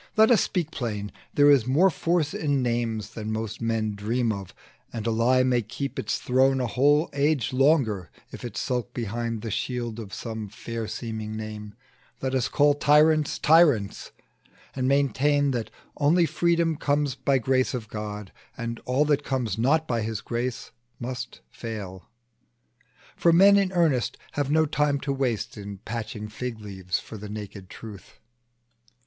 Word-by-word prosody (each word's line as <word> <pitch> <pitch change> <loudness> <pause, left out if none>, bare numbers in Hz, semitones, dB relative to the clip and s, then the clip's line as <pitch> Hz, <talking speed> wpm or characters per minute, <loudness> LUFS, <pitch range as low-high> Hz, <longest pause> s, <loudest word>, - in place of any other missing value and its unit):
Let 220 +2 +6
us 230 - +6
speak 170 -5 -1
plain: 105 -8 -4 0.2
there 145 0 +6
is 130 -5 +4
more 170 +9 +4
force 165 -2 0
in 145 -4 0
names 115 -3 -1
Than 110 -1 -5
most 110 0 -4
men 115 -2 0
dream 115 +3 0
of; 100 -3 -6 0.4
and 115 -2 -5
a 115 - +1
lie 125 +3 +3
may 125 -1 +2
keep 135 +6 -5
Its - - -1
throne 130 +1 +2
a 125 - 0
whole 145 +6 +3
age 140 -3 +1
longer, 130 - +2 0.2
if - - -9
it 120 -3 -6
skulk 125 -1 -2
Behind 115 0 -3
the 115 - -4
shield 120 0 -3
of 105 -3 -8
some 110 -2 -5
fair 115 +2 -5
seeming 110 -2 -5
name, 105 -1 -7 0.4
Let 130 0 -2
us 130 -2 +1
call 145 0 +4
tyrants, 150 +1 +4
tyrants, 150 - +3 0.7
and 130 -1 0
maintain, 140 +1 +2
That 120 -3 -2 0.3
only 165 +4 +4
freedom 170 -1 +1
comes 145 -2 0
by 135 +1 +1
grace 130 +1 +1
of 115 -4 -5
God, 105 -1 -6 0.3
And 115 0 -4
all 130 +4 +2
that 145 -1 +1
comes 120 -8 -2
not 155 +7 +2
by 115 -2 0
his 110 0 -3
grace 120 +1 -4 0.3
must 125 +1 -6
fall 100 -5 -7 1.1
For 170 - +4
men 195 +4 +7
in 195 -2 +2
earnest 160 -9 +1
have 145 -1 -2
no 160 +1 +4
time 145 -1 +1
to 140 -1 -1
waste 125 -6 -2
In 100 -1 -7
patching 110 +1 -5
fig 115 +1 -5
leaves 95 -4 -3
for 110 - -10
the 105 0 -8
naked 100 -2 -8
truth. 105 -4 -11
125 Hz, 165 wpm, -26 LUFS, 110-145 Hz, 1.1 s, men